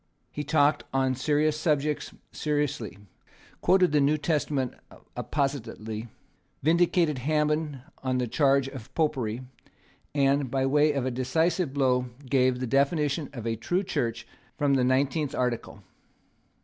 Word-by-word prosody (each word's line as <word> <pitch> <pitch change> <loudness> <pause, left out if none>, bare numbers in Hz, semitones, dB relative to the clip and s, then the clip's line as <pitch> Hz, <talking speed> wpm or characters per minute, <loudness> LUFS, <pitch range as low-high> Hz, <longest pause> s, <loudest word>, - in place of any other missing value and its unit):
He 150 - -4
talked 145 0 +3
on 130 -1 +2
serious 150 +3 +1
subjects 150 -1 0 0.2
seriously, 145 -9 -2 0.6
quoted 185 -2 +4
the 150 -1 +3
New 145 +2 +3
Testament 145 -4 -1 0.4
appositely, 115 -6 -3 0.6
vindicated 165 -2 +3
Hammond 150 0 0 0.2
from 130 -1 0
the 125 - 0
charge 135 +2 +2
of 130 -5 -10
popery, 130 -7 0 0.7
and, 140 -1 +2
by 135 +1 0
way 150 +3 +4
of 135 -3 -1
a 130 - 0
decisive 160 +6 0
blow, 130 -2 +1 0.2
gave 130 -1 +2
the 130 - -2
definition 140 +3 +1
of 120 -5 -7
a 115 -1 0
true 175 - -1
Church 120 - -2 0.3
from 145 -1 +2
the 130 -2 +3
nineteenth 140 +3 +1
Article. 120 -4 -2
140 Hz, 130 wpm, -27 LUFS, 130-150 Hz, 0.7 s, quoted